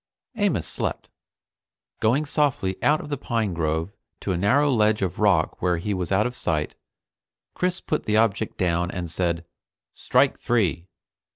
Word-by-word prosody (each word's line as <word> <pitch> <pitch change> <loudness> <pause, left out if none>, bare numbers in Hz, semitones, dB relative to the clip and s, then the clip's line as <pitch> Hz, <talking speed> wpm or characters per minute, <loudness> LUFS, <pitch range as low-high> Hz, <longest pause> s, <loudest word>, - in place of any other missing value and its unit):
Amos 200 - +1
slept. - - -3 0.9
Going 125 +7 +2
softly 140 -11 0
out 150 +1 +3
of - - -9
the 145 -3 -3
pine 115 -7 -1
grove 80 +2 -1 0.3
to 100 - -2
a - - 0
narrow 140 +11 +3
ledge 105 -3 +2
of 90 -4 -3
rock 100 -6 +2
where 90 -1 +2
he 100 +5 -2
was 90 -2 -3
out 95 +2 +3
of 125 0 -3
sight, 80 -9 -1 0.8
Chris 180 +1 -1
put 155 - -2
the 105 0 +2
object 110 -1 +1
down 85 -1 +1
and 90 -3 -4
said: 85 -1 -1 0.5
"Strike - - +2
three." 95 -7 0
100 Hz, 160 wpm, -24 LUFS, 85-120 Hz, 0.9 s, out